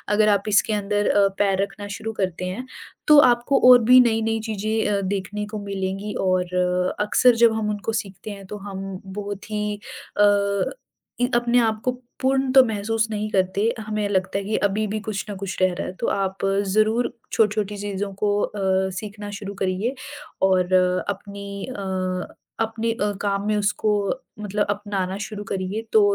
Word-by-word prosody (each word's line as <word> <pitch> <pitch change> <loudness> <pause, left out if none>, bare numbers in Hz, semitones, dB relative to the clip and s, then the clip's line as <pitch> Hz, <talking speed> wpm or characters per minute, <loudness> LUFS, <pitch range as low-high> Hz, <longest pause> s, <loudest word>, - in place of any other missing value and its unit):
अगर 215 0 +4
आप 200 -1 +3
इसके 210 +1 +3
अंदर 205 0 0
अ, 200 -1 +4
पैर 195 -1 +2
रखना 205 +1 -6
शुरू 225 0 -5
करते 185 -1 -2
हैं, 190 +8 -4 0.4
तो 300 - +8
आपको 240 +3 +1
और 250 - +9
भी 250 +3 +8
नई-नई 225 -1 +1
चीज़ें 215 +1 -1
अ, 200 -1 +1 0.2
देखने 205 +2 -4
को 215 - -3
मिलेंगी 195 +1 -3
और 180 0 +1
अक्सर 235 +3 +4
जब 225 - +4
हम 220 -1 -1
उनको 210 +2 -3
सीखते 200 +2 -10
हैं 200 -1 -9
तो 210 - -6
हम 195 -1 -6
बहुत 200 +2 -6
ही 210 -1 -2 0.4
अ, 200 -1 +3 0.6
इ 245 - +4
अपने 240 +1 +3
आप 220 -2 +1
को 250 - +3 0.3
पूर्ण 265 0 +2
तो 265 -1 +9
महसूस 220 0 -1
नहीं 215 0 -2
करते 195 +4 +1
हमें 215 -1 -2
लगता 190 0 0
है 200 - -2
कि 215 +2 -1
अभी 210 +2 -1
भी 215 +2 -2
कुछ 215 -3 -3
न 205 - -4
कुछ 195 -1 -5
रह 185 -1 +3
रहा 185 - -4
है - - -5
तो - - -1
आप 195 0 -1 0.2
ज़रूर 215 +4 +2 0.2
छोटी-छोटी 210 -1 +1
चीज़ों 200 0 -3
को 205 -1 +2
अ, 190 -1 0
सीखना 205 -1 -7
शुरू 200 -1 -6
करिए 190 +6 0 0.5
और 185 -1 +3 0.4
अपनी 200 0 -6
अ, 250 -6 -6 0.8
अपने 225 +1 -2
अ, 205 -2 -1
काम 200 0 -1
में 215 - +2
उसको 210 +1 +1 0.5
मतलब 210 0 -1
अपनाना 200 -2 -3
शुरू 210 -1 -7
करिए 195 +3 -2
तो 220 - +7
205 Hz, 175 wpm, -23 LUFS, 195-215 Hz, 0.8 s, और